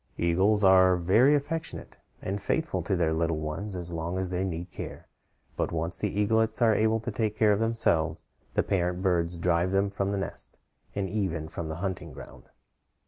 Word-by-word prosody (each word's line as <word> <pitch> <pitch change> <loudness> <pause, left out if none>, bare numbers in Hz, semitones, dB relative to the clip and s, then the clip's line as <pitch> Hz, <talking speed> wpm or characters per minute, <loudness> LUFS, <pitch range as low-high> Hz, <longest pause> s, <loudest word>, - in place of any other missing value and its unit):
Eagles 95 +5 +2
are 95 -1 +6
very 110 +12 +4
affectionate 160 +3 -4 0.3
and 100 +2 -3
faithful 160 +10 -1
to 95 - -1
their 85 -3 +1
little 80 0 0
ones 80 +7 -4
as 85 -1 -3
long 85 +2 -3
as 95 -1 -2
they 90 +1 -1
need 85 -1 -4
care; - - -8 0.5
but - - -1
once 85 +1 -1
the 105 - 0
young 105 +2 0
eaglets 110 +1 +2
are 115 -2 +5
able 110 +1 +2
to 115 +2 -4
take 110 0 -1
care 110 -2 +4
of 100 - 0
themselves, 115 -8 0 0.3
the - - +3
parent 90 -1 -1
birds 85 -2 +1
drive 85 +1 +1
them 100 +1 +1
from 100 0 -1
the 100 - -1
nest, 95 - -3 0.4
and 100 -1 -1
even 90 -7 -2
from 80 0 -6
the 80 - -4
hunting 95 -2 -4
ground. - - -12
95 Hz, 195 wpm, -28 LUFS, 85-105 Hz, 0.5 s, are